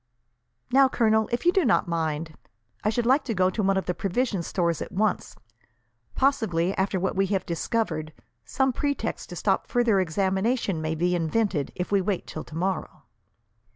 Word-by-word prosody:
"Now, 270 Hz, +1 st, +6 dB
Colonel, 220 Hz, -3 st, +2 dB
if 240 Hz, +7 st, -2 dB
you 350 Hz, -, +6 dB
do 380 Hz, -1 st, +2 dB
not 230 Hz, -7 st, +2 dB
mind, 160 Hz, -1 st, -2 dB, 0.5 s
I 210 Hz, -, +2 dB
should 235 Hz, +2 st, 0 dB
like 265 Hz, +5 st, +4 dB
to 230 Hz, -, -2 dB
go 185 Hz, 0 st, +3 dB
to 215 Hz, -, -2 dB
one 195 Hz, -1 st, +2 dB
of 190 Hz, -, -1 dB
the 180 Hz, -, -1 dB
provision 205 Hz, +1 st, -1 dB
stores 170 Hz, -1 st, -1 dB
at -, -, -5 dB
once. 210 Hz, +1 st, -1 dB, 0.8 s
Possibly, 195 Hz, -10 st, +1 dB
after 190 Hz, 0 st, 0 dB
what 190 Hz, -, -1 dB
we 195 Hz, 0 st, +2 dB
have 190 Hz, -1 st, -1 dB
discovered, 165 Hz, -3 st, -2 dB, 0.3 s
some 265 Hz, 0 st, 0 dB
pretext 285 Hz, +3 st, -2 dB
to -, -, -7 dB
stop -, -, 0 dB
further 240 Hz, -5 st, +2 dB
examination 190 Hz, +2 st, 0 dB
may 160 Hz, 0 st, -2 dB
be 175 Hz, +3 st, +1 dB
invented, 175 Hz, -2 st, 0 dB
if 180 Hz, -, -4 dB
we 200 Hz, -1 st, +3 dB
wait 195 Hz, -1 st, -2 dB
till 155 Hz, -, -7 dB
tomorrow." 180 Hz, +4 st, -3 dB
195 Hz, 175 wpm, -26 LUFS, 170-230 Hz, 0.8 s, Now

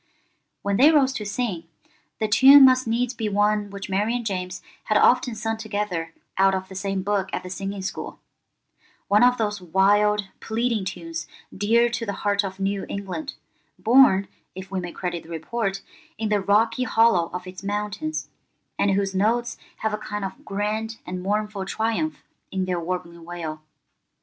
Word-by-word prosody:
When 200 Hz, 0 st, 0 dB
they 280 Hz, +5 st, +7 dB
rose 275 Hz, -4 st, +4 dB
to 215 Hz, -5 st, -4 dB
sing, 200 Hz, -6 st, -2 dB, 0.5 s
the 220 Hz, -, +1 dB
tune 270 Hz, +6 st, +9 dB
must 255 Hz, -1 st, +4 dB
needs 240 Hz, +2 st, 0 dB
be 225 Hz, -2 st, -2 dB
one 205 Hz, 0 st, +1 dB
which 200 Hz, 0 st, -7 dB
Mary 205 Hz, +5 st, 0 dB
and 240 Hz, -2 st, -3 dB
James 185 Hz, -3 st, -4 dB, 0.2 s
had 215 Hz, -, +2 dB
often 245 Hz, 0 st, +4 dB
sung 225 Hz, +1 st, -2 dB
together 205 Hz, -6 st, -3 dB, 0.3 s
out 195 Hz, 0 st, +5 dB
of 190 Hz, 0 st, -5 dB
the -, -, -9 dB
same 195 Hz, 0 st, -2 dB
book 200 Hz, -1 st, 0 dB
at -, -, -3 dB
the 180 Hz, -, -8 dB
singing 195 Hz, +1 st, -4 dB
school—one 205 Hz, +2 st, -4 dB
of 250 Hz, 0 st, +5 dB
those 210 Hz, -3 st, -1 dB
wild, 205 Hz, +3 st, +2 dB
pleading 225 Hz, -2 st, -1 dB
tunes 165 Hz, -2 st, -5 dB, 0.3 s
dear 230 Hz, +4 st, +3 dB
to 235 Hz, 0 st, -3 dB
the 200 Hz, -3 st, -3 dB
heart 205 Hz, 0 st, +2 dB
of 190 Hz, -1 st, -6 dB
New 195 Hz, 0 st, -1 dB
England, 200 Hz, +9 st, -5 dB, 0.4 s
born, 225 Hz, -5 st, +5 dB, 0.3 s
if 190 Hz, 0 st, -9 dB
we 190 Hz, -, -1 dB
may 175 Hz, -1 st, -5 dB
credit 175 Hz, -2 st, -4 dB
the 160 Hz, -, -17 dB
report, 195 Hz, +4 st, -3 dB, 0.3 s
in 220 Hz, -1 st, -2 dB
the 210 Hz, -1 st, +2 dB
rocky 225 Hz, +5 st, +2 dB
hollow 220 Hz, -9 st, +3 dB
of 180 Hz, 0 st, -6 dB
its 185 Hz, +1 st, -9 dB
mountains, 210 Hz, +10 st, -3 dB, 0.5 s
and 200 Hz, -, +3 dB
whose 195 Hz, 0 st, +1 dB
notes 230 Hz, +5 st, +1 dB, 0.3 s
have 220 Hz, -1 st, 0 dB
a 210 Hz, -, -2 dB
kind 210 Hz, -1 st, -4 dB
of 240 Hz, +9 st, -8 dB
grand 215 Hz, +1 st, -2 dB
and 180 Hz, 0 st, -5 dB
mournful 210 Hz, +1 st, -1 dB
triumph 225 Hz, +10 st, -2 dB, 0.3 s
in 190 Hz, -1 st, -2 dB
their 180 Hz, -1 st, -1 dB
warbling 170 Hz, -1 st, -5 dB
wail. 165 Hz, -2 st, -6 dB
205 Hz, 170 wpm, -24 LUFS, 190-225 Hz, 0.5 s, tune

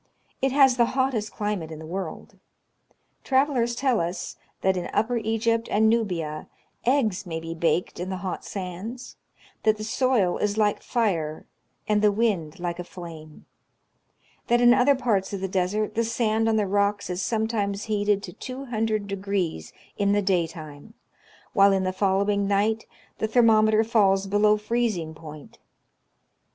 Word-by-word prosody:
It 270 Hz, 0 st, +2 dB
has 265 Hz, -2 st, +5 dB
the 240 Hz, -, +5 dB
hottest 255 Hz, -5 st, 0 dB
climate 205 Hz, -6 st, -3 dB
in 160 Hz, -, -7 dB
the 160 Hz, -, -9 dB
world. 180 Hz, 0 st, -6 dB, 0.8 s
Travelers 260 Hz, -3 st, +1 dB
tell 255 Hz, -1 st, +1 dB
us, 170 Hz, +2 st, -3 dB, 0.3 s
that, 190 Hz, 0 st, +2 dB
in 180 Hz, -1 st, -3 dB
upper 235 Hz, +3 st, +1 dB
Egypt 225 Hz, +1 st, 0 dB
and 220 Hz, +1 st, +3 dB
Nubia, 170 Hz, -9 st, -2 dB, 0.4 s
eggs 230 Hz, -8 st, +1 dB
may 165 Hz, -1 st, -3 dB
be 165 Hz, 0 st, -6 dB
baked 170 Hz, +2 st, 0 dB
in 180 Hz, +1 st, -4 dB
the 190 Hz, -, -3 dB
hot 185 Hz, -, -4 dB
sands; 200 Hz, +6 st, -7 dB, 0.5 s
that 215 Hz, 0 st, +2 dB
the 215 Hz, -, -6 dB
soil 225 Hz, -5 st, +1 dB
is 210 Hz, 0 st, 0 dB
like 210 Hz, -2 st, +2 dB
fire, 170 Hz, -10 st, -1 dB, 0.4 s
and 210 Hz, -1 st, +2 dB
the 210 Hz, -1 st, +4 dB
wind 195 Hz, -7 st, -1 dB
like 175 Hz, 0 st, -3 dB
a -, -, -3 dB
flame; 165 Hz, -4 st, -11 dB, 1.0 s
that 240 Hz, 0 st, +3 dB
in 240 Hz, 0 st, +7 dB
other 270 Hz, +3 st, +4 dB
parts 210 Hz, -7 st, 0 dB
of 200 Hz, -, -3 dB
the 190 Hz, -, -1 dB
desert 195 Hz, +3 st, -1 dB
the 230 Hz, -, +1 dB
sand 225 Hz, -1 st, +1 dB
on 220 Hz, -, +2 dB
the 215 Hz, -1 st, +2 dB
rocks 200 Hz, +1 st, 0 dB
is 180 Hz, +1 st, -3 dB
sometimes 215 Hz, -3 st, -1 dB
heated 205 Hz, -2 st, 0 dB
to 180 Hz, -, -8 dB
200° 205 Hz, -, -3 dB, 0.3 s
in 200 Hz, 0 st, +2 dB
the 205 Hz, -, +2 dB
day 180 Hz, -3 st, +2 dB
time, 155 Hz, +5 st, -11 dB, 0.6 s
while 200 Hz, 0 st, +6 dB
in 190 Hz, -1 st, +1 dB
the 185 Hz, 0 st, -1 dB
following 200 Hz, +1 st, +1 dB
night 210 Hz, +3 st, +1 dB, 0.3 s
the 220 Hz, -, 0 dB
thermometer 220 Hz, -1 st, +4 dB
falls 200 Hz, -4 st, +3 dB
below 210 Hz, +2 st, +3 dB
freez 230 Hz, 0 st, 0 dB
ing 160 Hz, -1 st, -6 dB
point. 155 Hz, -2 st, -12 dB
205 Hz, 160 wpm, -25 LUFS, 185-225 Hz, 1.0 s, in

